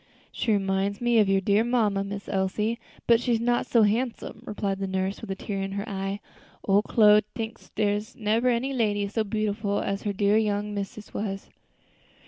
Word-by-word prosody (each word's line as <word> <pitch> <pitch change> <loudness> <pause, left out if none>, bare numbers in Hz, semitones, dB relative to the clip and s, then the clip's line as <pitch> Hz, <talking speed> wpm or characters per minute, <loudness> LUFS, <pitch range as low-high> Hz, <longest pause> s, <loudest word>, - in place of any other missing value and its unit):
"She 230 - -1
reminds 195 0 0
me 240 -1 +3
of 205 -2 +4
your 195 0 +3
dear 200 +3 +3
mamma, 220 -5 +1
Miss 200 0 -6
Elsie, 210 +4 -1 0.3
but 235 0 +5
she's 240 -2 +1
not 240 +1 +1
so 230 -2 +4
handsome," 225 +1 -1
replied 200 -2 -2
the 195 - -2
nurse, 190 +1 -2
with 225 - -8
a 195 - -2
tear 195 0 -4
in 195 0 -3
her 200 +1 -4
eye; 195 0 -3 0.5
"ole 200 +1 +5
Chloe 210 -1 +5
tinks 225 -1 -6
dere's 205 0 -1
nebber 225 +3 +1
any 250 +3 0
lady 205 -5 +1
so 220 +2 -1
beautiful 210 -1 -1
as 195 0 -2
her 205 - -1
dear 200 +1 +2
young 210 -1 -1
missus 205 +1 -6
was." 195 -2 -4
205 Hz, 185 wpm, -26 LUFS, 195-225 Hz, 0.5 s, but